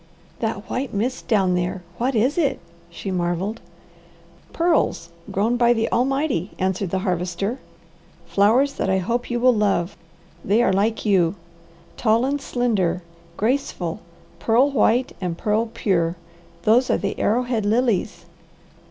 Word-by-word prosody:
"That 220 Hz, -2 st, -3 dB
white 255 Hz, -3 st, -3 dB
mist 245 Hz, +6 st, -2 dB
down 195 Hz, -6 st, +3 dB
there, 180 Hz, +1 st, -2 dB, 0.2 s
what 255 Hz, +2 st, 0 dB
is 245 Hz, +7 st, +2 dB
it?" 290 Hz, -6 st, +1 dB, 0.3 s
she 195 Hz, -, -6 dB
marvelled. 180 Hz, +5 st, -2 dB, 0.9 s
"Pearls 325 Hz, -, +1 dB, 0.2 s
grown 225 Hz, +5 st, +1 dB
by 240 Hz, 0 st, +4 dB
the 225 Hz, -1 st, -1 dB
Almighty," 265 Hz, -, 0 dB
answered 190 Hz, 0 st, -1 dB
the 190 Hz, -, -1 dB
Harvester. 180 Hz, +6 st, -2 dB, 0.7 s
"Flowers 235 Hz, +8 st, +3 dB
that -, -, -2 dB
I 190 Hz, -, +3 dB
hope 235 Hz, +7 st, -2 dB
you 240 Hz, -1 st, -1 dB
will 250 Hz, +1 st, +5 dB
love. 200 Hz, -4 st, 0 dB, 0.5 s
They 215 Hz, +5 st, +3 dB
are 190 Hz, -, +2 dB
like 215 Hz, +4 st, 0 dB
you. 190 Hz, -4 st, +3 dB, 0.6 s
Tall 230 Hz, +1 st, +2 dB
and 285 Hz, +1 st, -1 dB
slender, 200 Hz, -10 st, 0 dB, 0.3 s
graceful, 215 Hz, -7 st, -1 dB, 0.4 s
pearl 250 Hz, +5 st, +3 dB
white 250 Hz, -1 st, +2 dB
and 175 Hz, -2 st, -2 dB
pearl 215 Hz, +4 st, 0 dB
pure 175 Hz, -7 st, 0 dB, 0.5 s
those 245 Hz, +4 st, +4 dB
are -, -, +3 dB
the 200 Hz, -, -3 dB
arrowhead 240 Hz, 0 st, +1 dB
Lilies." 225 Hz, -1 st, 0 dB
220 Hz, 135 wpm, -22 LUFS, 190-245 Hz, 0.9 s, will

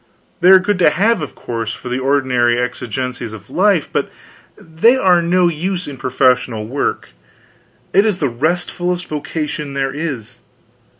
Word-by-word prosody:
They 180 Hz, 0 st, +4 dB
are 190 Hz, -, +10 dB
good 190 Hz, +1 st, 0 dB
to 175 Hz, -, +6 dB
have, 205 Hz, +5 st, +1 dB
of 150 Hz, -, -6 dB
course, 115 Hz, -2 st, -4 dB
for -, -, -10 dB
the 125 Hz, +1 st, -2 dB
ordinary 130 Hz, -3 st, +2 dB
exigencies 125 Hz, -1 st, -4 dB
of 110 Hz, -, -12 dB
life, 190 Hz, -4 st, +2 dB
but -, -, -1 dB, 0.5 s
they 170 Hz, +11 st, +2 dB
are 180 Hz, -8 st, +4 dB
no 175 Hz, +1 st, +2 dB
use 180 Hz, +3 st, -2 dB
in 145 Hz, -, -6 dB
professional 125 Hz, -3 st, +1 dB
work. 130 Hz, +6 st, -2 dB, 0.8 s
It 195 Hz, -, +5 dB
is 215 Hz, -4 st, +1 dB
the 155 Hz, -, -1 dB
restfulest 175 Hz, +6 st, -2 dB
vocation 150 Hz, -1 st, -4 dB
there 135 Hz, -1 st, -1 dB
is. 130 Hz, -7 st, -5 dB
150 Hz, 155 wpm, -17 LUFS, 125-180 Hz, 0.8 s, are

